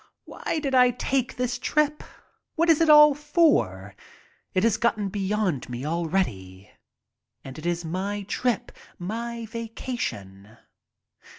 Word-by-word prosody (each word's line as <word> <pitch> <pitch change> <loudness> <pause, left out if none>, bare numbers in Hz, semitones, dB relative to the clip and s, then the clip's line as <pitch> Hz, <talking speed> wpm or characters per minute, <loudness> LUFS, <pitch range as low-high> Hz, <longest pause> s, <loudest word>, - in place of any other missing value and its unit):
Why - - -4
did 275 -3 -3
I 250 -1 +6
take 255 +1 -1
the 250 0 -1
trip? 295 +5 0 0.5
What 335 +1 +4
is 320 - +3
it 325 - +3
all 300 -1 +8
for? 275 - +1 0.6
It 185 - +2
has 230 -3 +3
gotten 215 -4 0
beyond 195 - -2
me 125 +2 -5
already 150 - -2 0.7
and 135 +2 -9
it 160 - -5
is 175 0 -2
my 195 +5 -3
trip, 240 +3 -2 0.3
my 230 +5 -5
vacation. 210 - -6
210 Hz, 125 wpm, -25 LUFS, 160-255 Hz, 0.7 s, all